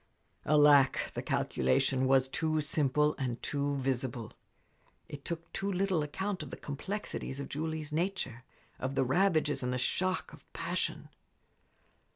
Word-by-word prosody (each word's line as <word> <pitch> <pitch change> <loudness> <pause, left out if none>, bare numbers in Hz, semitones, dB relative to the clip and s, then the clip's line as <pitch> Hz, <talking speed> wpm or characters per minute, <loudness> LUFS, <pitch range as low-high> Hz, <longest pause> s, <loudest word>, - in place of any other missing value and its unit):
Alack! 145 -2 +5
the - - -3
calculation 130 - +1
was 135 0 +4
too 155 +3 0
simple 150 0 +2
and 125 -3 -2
too 145 0 0
visible. 130 -3 -2 0.8
It 140 -1 -8
took 170 0 -5
too 200 +1 -1
little 190 -3 +1
account 190 +6 -3
of 150 - -6
the - - -7
complexities 145 -2 -4
of 140 - -5
Julie's 155 0 -3
nature, 160 - -2 0.4
of 130 +1 -2
the 135 - +3
ravages 155 0 +2
and 125 -1 -1
the 125 - 0
shock 185 +9 -1
of - - -16
passion. - - -2
145 Hz, 140 wpm, -32 LUFS, 130-165 Hz, 0.8 s, Alack